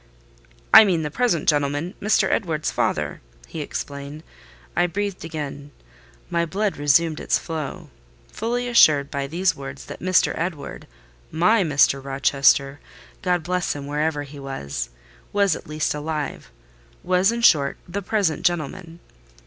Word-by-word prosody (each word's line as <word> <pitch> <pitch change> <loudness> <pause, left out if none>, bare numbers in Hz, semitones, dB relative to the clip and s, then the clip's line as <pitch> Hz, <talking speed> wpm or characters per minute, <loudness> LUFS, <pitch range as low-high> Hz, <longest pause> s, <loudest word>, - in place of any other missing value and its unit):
"I 220 - +12
mean 175 -6 +1
the 150 - -4
present 220 -6 0
gentleman, 145 +3 +1
Mr. 215 +2 +3
Edward's 160 -6 -1
father," - - -1 0.3
he - - -6
explained. 140 +2 -6 0.5
I 175 - +3
breathed 200 +2 -3
again: 145 -3 -6 0.6
my 170 0 0
blood 195 +5 -1
resumed 150 +2 +2
its - - +1
flow. 155 -4 -6 0.4
Fully 245 +2 -2
assured 150 -12 +5
by 140 -1 -2
these 175 +6 0
words 135 -1 -8
that - - -9
Mr. 185 0 +2
Edward—my 160 - -2
Mr. 145 -3 +3
Rochester 135 +1 +2 0.4
(God 180 -2 0
bless 180 +1 -1
him, 140 -1 -6
wherever 150 +1 -1
he 145 0 -11
was!)—was 70 - -3
at - - -10
least 155 +1 -1
alive: 150 0 -4 0.5
was, 185 +3 +3
in 235 0 -3
short, 140 -10 +4
"the 195 +4 -4
present 195 -4 0
gentleman." 170 0 -2
155 Hz, 135 wpm, -23 LUFS, 140-180 Hz, 0.6 s, I